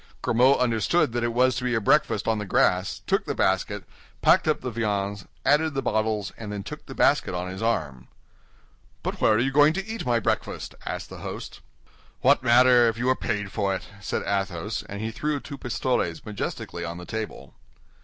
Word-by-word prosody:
Grimaud 125 +4 +4
understood 120 - +2
that 120 0 -1
it 120 - 0
was 125 +2 +3
to 125 - -3
be 125 -1 0
a - - +2
breakfast 125 -1 +2
on 110 -1 +1
the 105 - -4
grass, 90 +1 +1
took - - +1
the - - -3
basket, 95 +1 0 0.4
packed - - +5
up 155 - +1
the 125 - -4
viands, 100 -3 -2 0.2
added 150 +2 +3
the 135 - -1
bottles, 110 -2 0
and 105 -2 -6
then 100 -1 -4
took - - -9
the - - -8
basket - - +2
on 90 +1 -3
his 95 - -7
arm. 70 - -1 1.0
"But - - -4
where 110 - +5
are 110 - +3
you 135 +3 +1
going 145 +2 +5
to 195 +3 -3
eat 225 +1 -5
my 120 -1 +2
breakfast?" - - -2
asked - - -4
the - - -8
host. - - -7 0.6
"What - - +5
matter, 120 0 +6
if 115 -1 0
you 125 +2 -1
are 130 - +4
paid 105 -6 -3
for 100 -3 0
it?" - - -8
said 100 - -3
Athos, 100 0 -2
and 100 +1 -5
he 110 +1 -2
threw 150 +5 -2
two 140 0 -9
pistoles 120 -8 -1
majestically 95 -4 -5
on 85 0 -5
the 90 - -8
table. 110 - -6
110 Hz, 205 wpm, -25 LUFS, 100-125 Hz, 1.0 s, matter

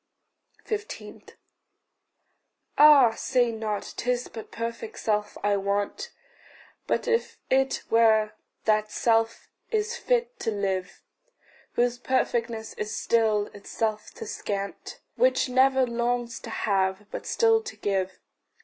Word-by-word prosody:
15. 430 -1 -6 1.5
Ah, 290 -5 +8
say 245 +1 +1
not, 220 -2 -4
'tis 245 0 -1
but 225 - -9
perfect 235 - -5
self 210 -1 -1
I 205 0 +2
want 200 - -2 0.8
But - - 0
if 460 0 0
it 270 0 +2
were, 220 -2 +4 0.3
that 215 -1 +2
self 225 +1 +1 0.2
is 440 +1 0
fit 485 0 0
to - - -1
live 195 -3 -2 0.7
Whose 245 0 +1
perfectness 235 -3 -1
is 210 0 -3
still 220 -3 +2
itself 215 +1 -3
to - - -7
scant, 200 -1 -5 0.2
Which - - +3
never 265 +1 +4
longs 235 0 -1
to 230 - -9
have, 195 -2 0
but - - -6
still 450 -1 +3
to 460 +2 -8
give. 190 -2 -2
230 Hz, 115 wpm, -26 LUFS, 210-265 Hz, 1.5 s, Ah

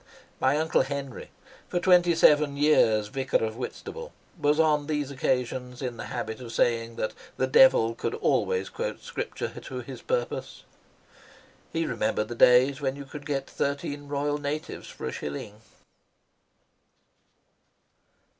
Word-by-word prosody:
My 135 +3 +3
Uncle 160 +1 +2
Henry, 140 -2 -5 0.4
for 175 - 0
twenty 175 -1 +5
seven 150 -3 +4
years 110 -8 +4
Vicar 130 -2 0
of 110 0 -4
Whitstable, 475 - -7 0.2
was 150 +1 +1
on 150 -2 +3
these 150 -3 -2
occasions 125 -1 -2
in 125 -3 -4
the - - -6
habit 120 -1 -5
of 120 -2 -8
saying 115 0 +1
that 110 - -2 0.2
the 130 - +2
devil 130 - +5
could - - -3
always 470 -1 +1
quote - - -5
scripture - - -4
to - - -6
his - - -9
purpose. - - -3 1.1
He 165 0 -1
remembered 110 -3 -1
the - - -3
days 130 +4 +5
when 135 -1 -1
you 140 0 -8
could 145 +2 -9
get 135 -2 -1
thirteen 145 0 -3
Royal 145 +1 -1
Natives 145 +2 -4
for - - -8
a - - -2
shilling. 100 +9 -6
140 Hz, 140 wpm, -27 LUFS, 120-150 Hz, 1.1 s, twenty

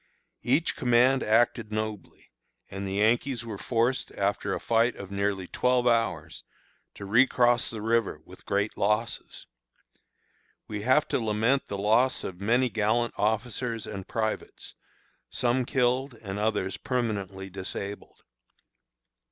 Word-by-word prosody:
Each 140 +7 +1
command 125 +2 +3
acted 115 0 +2
nobly, 110 -2 -5 0.4
and 95 0 -4
the 95 - -3
Yankees 120 +4 +1
were 105 -4 -6
forced, 125 +2 0
after 100 0 -1
a - - -4
fight 115 +1 +2
of 100 -1 -9
nearly 100 -1 -1
twelve 125 +6 +1
hours, 100 -10 0 0.5
to 100 - -8
recross 120 +2 +3
the 110 -2 -6
river 115 -1 +1
with - - -15
great 100 +2 0
losses. 105 +3 -1 1.2
We 105 -1 -4
have 130 +7 +3
to - - +1
lament 115 +4 +1
the 100 - -4
loss 115 +6 +2
of 90 0 -6
many 120 +5 +3
gallant 115 +1 0
officers 110 +1 -1
and 100 -3 -7
privates, 110 -1 -3 0.6
some 125 +1 +1
killed 125 0 +1
and 100 -3 -6
others 105 -3 -1
permanently 100 -6 -3
disabled. 100 +2 -6
110 Hz, 125 wpm, -27 LUFS, 100-120 Hz, 1.2 s, command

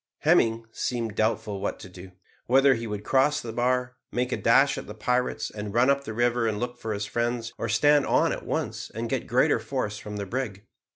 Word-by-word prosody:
Hemming 115 0 +3
seemed 115 -3 -2
doubtful 110 -2 -1
what 100 - -2
to - - -9
do; 95 0 -11 0.4
whether 135 +2 +5
he 115 -1 -4
would 105 -1 -4
across 135 +6 +2
the 115 -1 -6
bar, 125 +1 0
make 125 +1 -1
a - - 0
dash 135 +4 +4
at - - -9
the 105 - -8
pirates, 125 +3 -1
and 105 0 -6
run 125 +3 +5
up 140 0 -1
the 110 - -5
river 120 0 +2
and 105 -2 -1
look 120 0 -4
for 110 - -4
his 100 0 -3
friends, 120 0 -2
or 115 - -2
stand 145 +6 +4
on - - +3
at - - -4
once - - -3
and - - -3
get - - -2
greater - - +3
force 105 +1 -3
from 105 0 -7
the 100 - -3
brig. 110 -3 -4
115 Hz, 220 wpm, -26 LUFS, 105-125 Hz, 0.4 s, whether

